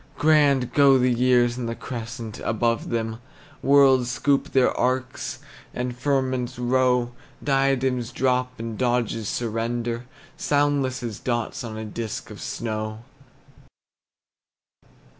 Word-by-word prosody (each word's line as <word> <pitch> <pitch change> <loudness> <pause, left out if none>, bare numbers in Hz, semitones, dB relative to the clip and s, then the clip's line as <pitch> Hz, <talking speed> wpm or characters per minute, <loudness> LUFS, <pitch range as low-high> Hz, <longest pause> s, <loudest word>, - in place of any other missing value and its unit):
Grand 145 -5 +3
go 140 -2 +6
the 125 -1 +3
years 120 0 +3
in 120 - -3
the 115 - -3
crescent 115 -2 -6
above 115 +1 0
them; 115 -1 -2 0.4
Worlds 135 -3 +5
scoop 140 +2 +1
their 130 -2 +3
arcs, 130 +1 -1 0.4
and 125 0 -3
firmaments 130 -1 -1
row, 125 0 +2 0.3
Diadems 135 -3 +1
drop 125 -1 0
and 115 -1 -5
Doges 120 -3 0
surrender, 115 +1 -2 0.3
Soundless 145 -3 +1
as 115 -4 -5
dots 120 -2 -2
on 110 -2 -6
a 110 - -5
disk 110 +1 -5
of - - -10
snow. 110 -1 -4
125 Hz, 115 wpm, -24 LUFS, 115-130 Hz, 0.4 s, go